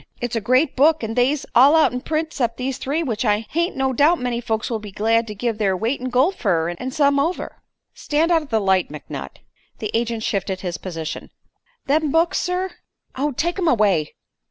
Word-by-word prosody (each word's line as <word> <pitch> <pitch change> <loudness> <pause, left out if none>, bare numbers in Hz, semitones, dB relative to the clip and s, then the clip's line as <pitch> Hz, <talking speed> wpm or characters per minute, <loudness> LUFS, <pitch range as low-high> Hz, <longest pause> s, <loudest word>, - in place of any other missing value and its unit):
It's 240 0 -3
a 225 - 0
great 255 +6 +2
book 305 +1 +4
an' 225 0 -3
they's 260 +4 +1
all 275 +6 +7
out'n 255 -6 +3
print 315 +2 -2
'cept 235 -4 -1
these 255 0 -3
three, 300 +5 -1
which 230 -7 -2
I 210 -1 +1
hain't 340 +2 0
no 265 -1 0
doubt 300 +7 +4
many 245 -1 -2
folks 225 +1 -2
would 225 -2 -2
be 210 -1 -9
glad 225 +3 +1
to 210 - -6
give 225 +1 -2
their 195 -3 +1
weight 230 +7 -1
in 255 - -3
gold 260 +9 +3
fer, 165 0 0
an' 210 +9 -5
some 280 0 +2
over." 330 +6 -2 0.3
"Stand 315 +3 0
out 330 -1 +4
of 300 - -12
the 225 - +2
light, 190 -2 +2
McNutt." - - -8 0.4
The 215 -3 -4
agent 230 -1 -1
shifted 190 -3 -2
his 175 -3 -4
position. 165 -4 -6 0.6
"Them 300 +1 +1
books, 330 +3 +2
sir 365 +1 -2 0.2
" - - -38
"Oh, 290 +3 -1
take 345 +8 -2
'em 350 - 0
away." 205 - +2
250 Hz, 210 wpm, -21 LUFS, 215-300 Hz, 0.6 s, all